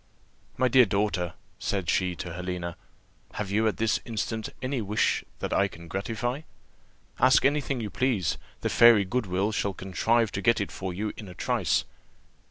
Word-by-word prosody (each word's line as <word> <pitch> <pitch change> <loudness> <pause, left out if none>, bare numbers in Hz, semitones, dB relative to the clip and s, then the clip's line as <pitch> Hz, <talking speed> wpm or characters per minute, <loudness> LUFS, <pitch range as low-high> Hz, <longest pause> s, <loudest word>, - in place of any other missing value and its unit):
"My 130 - +3
dear 125 -1 +6
daughter," 100 -3 0 0.2
said 95 -4 -2
she 90 +1 +1
to 85 0 -6
Helena, 90 -1 -4 0.6
"have 100 -2 -4
you 110 +2 +2
at 110 - 0
this 110 -1 +1
instant 110 -1 -3
any 130 -1 -2
wish 105 +1 +1
that - - -3
I 100 - +3
can 85 -2 -12
gratify? 115 - -3 0.8
Ask 130 0 +5
any 145 +2 +3
thing 135 -3 -3
you 105 -3 -4
please, 125 - 0 0.2
the - - 0
fairy 115 -4 +7
Goodwill 95 -1 0
shall 100 -2 -1
contrive 110 +4 +1
to 100 - -3
get 115 +4 +3
it 100 - -3
for 95 -1 -4
you 105 +4 -3
in 105 - -8
a 90 - -10
trice. - - +1
105 Hz, 175 wpm, -27 LUFS, 95-115 Hz, 0.8 s, fairy